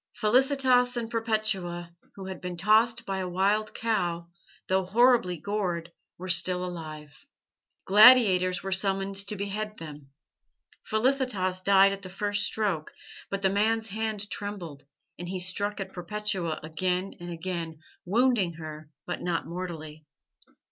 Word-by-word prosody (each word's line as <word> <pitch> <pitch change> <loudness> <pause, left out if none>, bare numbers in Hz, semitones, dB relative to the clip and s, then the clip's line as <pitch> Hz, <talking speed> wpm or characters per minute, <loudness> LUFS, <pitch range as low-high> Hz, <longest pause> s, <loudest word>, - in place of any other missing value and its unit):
Felicitas 250 +1 +3
and 235 -1 -4
Perpetua, 215 -7 -1 0.2
who 195 - -8
had 190 -1 -7
been 180 -1 -5
tossed 215 +5 +3
by 195 -1 -3
a 185 -1 -3
wild 200 +4 0
cow, 175 -7 -1 0.4
though 190 0 +2
horribly 220 -2 +3
gored, 175 -2 -3 0.3
were 185 - -7
still 180 +1 +2
alive. 155 -4 -8 0.7
Gladiators 195 -5 +6
were 195 - -4
summoned 195 +1 0
to 210 - -2
behead 210 +2 -4
them. 150 -3 -10 0.7
Felicitas 220 -6 0
died 195 0 +5
at 195 - -7
the 185 - -8
first 205 +2 -1
stroke, 195 -8 -1 0.4
but 195 0 -4
the 190 - +3
man's 220 +2 +1
hand 215 0 -2
trembled, 180 -9 -6 0.3
and 175 0 -6
he 190 - -3
struck 200 +3 -1
at 190 -1 -6
Perpetua 185 -2 -3
again 180 +4 -2
and 175 0 -8
again, 170 -1 -5 0.3
wounding 215 -2 +2
her, 155 -1 -9 0.2
but - - -4
not 175 -1 -1
mortally. 160 -3 -7
190 Hz, 135 wpm, -27 LUFS, 175-215 Hz, 0.7 s, Gladiators